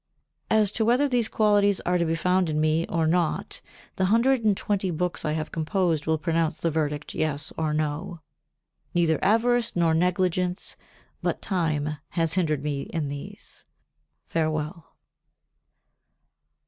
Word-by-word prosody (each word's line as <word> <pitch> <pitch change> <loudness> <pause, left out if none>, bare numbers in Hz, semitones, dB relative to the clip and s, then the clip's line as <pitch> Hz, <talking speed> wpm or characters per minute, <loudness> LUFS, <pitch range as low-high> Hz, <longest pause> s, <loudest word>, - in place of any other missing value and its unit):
As 215 -2 +3
to 220 - 0
whether 245 +6 +3
these 245 -4 +1
qualities 205 -2 +3
are 180 0 +1
to 170 - +2
be 165 0 0
found 180 +1 +1
in 155 0 0
me 155 +2 +1
or 165 -1 +1
not 165 0 0 0.4
the 190 - +2
hundred 230 +5 +3
and 210 -3 +3
twenty 200 -2 -1
books 175 +1 -1
I 150 - 0
have 155 0 -3
composed 165 -2 0
will 160 0 +2
pronounce 165 0 0
the 165 - 0
verdict 150 -1 -2
Yes 155 -1 -2
or 155 -1 -1
No. 155 +4 -2 0.8
Neither 165 -3 +2
avarice 235 +2 +2
nor 170 -2 +3
negligence, 180 +1 0 0.5
but - - -1
time 155 -5 -1
has 165 -2 0
hindered 155 -6 0
me 145 -2 -2
in 155 -4 -2
these. 140 0 -8 0.6
Farewell. 155 0 -3
170 Hz, 145 wpm, -26 LUFS, 155-190 Hz, 0.8 s, As